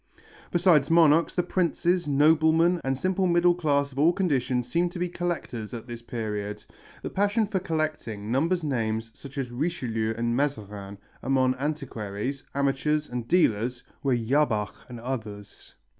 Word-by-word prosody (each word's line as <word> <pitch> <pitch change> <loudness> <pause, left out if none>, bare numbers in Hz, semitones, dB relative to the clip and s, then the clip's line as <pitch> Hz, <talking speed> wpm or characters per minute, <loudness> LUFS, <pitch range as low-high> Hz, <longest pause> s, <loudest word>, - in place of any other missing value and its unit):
Besides 170 -5 +4
monarchs, 165 -1 +5
the 180 - +2
princes, 175 -1 0
noblemen 160 +4 +4
and 135 0 0
simple 185 +4 +1
middle 175 0 +4
class 145 -5 +1
of 135 - -7
all 160 +4 +6
conditions 130 -9 0
seemed 170 +5 +1
to - - -6
be 180 +1 0
collectors 165 -11 -4
at 115 - -7
this 120 -2 -8
period. 105 -3 -4 0.4
The - - -4
passion 205 +3 +2
for 195 -2 -1
collecting 155 - -3
numbers 165 +7 +1
names 115 -5 -1
such 140 +5 -12
as 130 -3 -3
Richelieu 120 -6 -2
and 120 0 0
Mazarin, 105 -8 -3 0.2
among 130 -1 +2
antiquaries, 135 -4 -3
amateurs 140 +2 0
and 120 -2 -4
dealers 125 - +2 0.2
were 135 -3 +2
Jabach 115 -3 +1 0.2
and 120 -1 -8
others. 110 -5 -7
140 Hz, 145 wpm, -26 LUFS, 115-170 Hz, 0.4 s, all